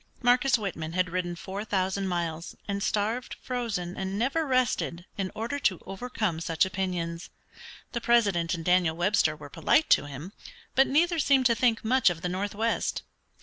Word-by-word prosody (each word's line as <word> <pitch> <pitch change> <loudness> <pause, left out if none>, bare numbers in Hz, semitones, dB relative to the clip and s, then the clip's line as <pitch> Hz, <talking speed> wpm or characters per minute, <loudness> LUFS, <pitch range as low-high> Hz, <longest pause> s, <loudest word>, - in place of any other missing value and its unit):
Marcus 250 +2 +4
Whitman 165 -7 -4
had 185 -1 0
ridden 175 -1 -2
four 195 +4 -6
thousand 190 -1 -1
miles, 170 -2 -3
and 200 0 -2
starved, 215 +5 -1
frozen, 220 -8 -3
and 190 +1 -3
never 275 +8 0
rested 245 -9 0
in 190 -2 -3
order 235 +6 -3
to 190 -10 +1
overcome 195 -3 -3
such 165 +1 +1
opinions. 180 -3 -3 0.6
The 235 - -3
President 200 -8 +2
and 165 -1 -7
Daniel 180 -3 +3
Webster 175 -4 +2
were 150 -1 -10
polite 300 - +2
to - - +5
him, 145 +7 -8 0.4
but 270 +1 +5
neither 335 +4 +2
seemed 275 -2 +3
to 240 - +5
think 230 -1 +1
much 255 -2 +4
of 170 -2 -5
the 180 - 0
northwest. 205 +5 -1
195 Hz, 165 wpm, -28 LUFS, 175-235 Hz, 0.6 s, to